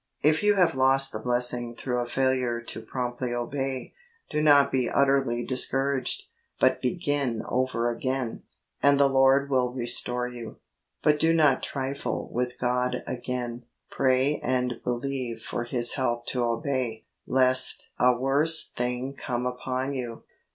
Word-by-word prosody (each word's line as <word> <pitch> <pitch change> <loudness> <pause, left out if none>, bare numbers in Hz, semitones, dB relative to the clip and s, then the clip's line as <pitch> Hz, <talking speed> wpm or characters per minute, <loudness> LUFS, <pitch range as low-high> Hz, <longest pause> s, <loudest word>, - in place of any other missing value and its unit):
If 155 +1 +3
you 210 0 +3
have 180 -3 +3
lost 135 +1 +3
the 110 - -5
blessing 120 0 0
through 125 +1 -2
a 120 - -2
failure 130 -2 0
to 115 -1 -5
promptly 120 +1 -4
obey, 135 +2 -4 0.4
do 150 - 0
not 145 -2 +5
be 130 -2 0
utterly 135 -4 +1
discouraged, 135 +1 0 0.4
but - - +3
begin 140 - -1
over 125 -2 0
again, 125 0 -3 0.4
and 140 0 +4
the 140 - +5
Lord 135 +1 +3
will 125 -2 +1
restore 125 0 -2
you. 120 -2 -9 0.5
But 150 0 +3
do 165 +1 +3
not 150 -5 +3
trifle 135 0 -4
w'ith 125 0 -2
God 125 0 -1
again; 120 -1 -5 0.3
pray 130 +2 +1
and 125 -2 -1
believe 125 -1 -3
for 120 - -4
His 120 -1 +4
help 120 -3 -1
to 125 -2 0
obey, 115 -1 -2 0.2
lest 130 0 +3
a 125 -1 +4
worse 145 +5 +2
thing 125 +2 -3
come 125 -2 -3
upon 130 +2 -3
you. 120 -4 -6
130 Hz, 145 wpm, -26 LUFS, 120-135 Hz, 0.5 s, not